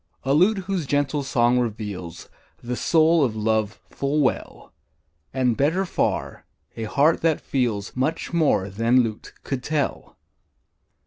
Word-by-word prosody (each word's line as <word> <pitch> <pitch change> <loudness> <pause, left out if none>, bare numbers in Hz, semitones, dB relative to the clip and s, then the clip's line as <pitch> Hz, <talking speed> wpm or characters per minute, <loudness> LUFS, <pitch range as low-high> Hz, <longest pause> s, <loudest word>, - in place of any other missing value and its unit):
A 135 - +1
lute 185 +8 +4
whose 185 -6 -2
gentle 145 +1 0
song 125 -2 +2
reveals 105 -7 -5 0.4
The 125 +1 -3
soul 160 +3 +3
of 115 -5 0
love 110 -1 -1
full 140 +2 -1
well; 130 - -2 0.6
And, 125 -3 +1
better 165 +9 +1
far, - - -2 0.3
a 115 - -4
heart 145 +8 +2
that 160 -2 +2
feels 115 -7 -2
Much 150 +7 -2
more 150 - +2
than 115 +6 +2
lute 110 -2 -6
could 135 -2 -3
tell. 150 +1 -3
130 Hz, 135 wpm, -23 LUFS, 115-155 Hz, 0.6 s, lute